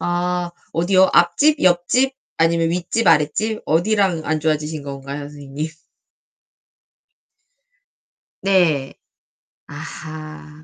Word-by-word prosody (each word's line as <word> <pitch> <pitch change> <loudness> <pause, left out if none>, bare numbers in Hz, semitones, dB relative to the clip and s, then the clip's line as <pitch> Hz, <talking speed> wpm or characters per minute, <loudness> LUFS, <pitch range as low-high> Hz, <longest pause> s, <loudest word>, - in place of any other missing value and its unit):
아 175 0 -1 0.2
어디요? 185 +3 +3
앞집? 175 - +4
옆집? 185 +10 +3 0.2
아니면 165 0 +2
윗집? 180 +6 -1
아랫집? 165 +8 +2
어디랑 180 +1 +1
안 155 0 0
좋아지신 155 -1 -1
건가요? 140 +1 -6
선생님? 145 +1 -6 2.8
네. 170 -8 +2 0.7
아 155 0 -9
165 Hz, 180 characters per minute, -20 LUFS, 155-180 Hz, 2.8 s, 앞집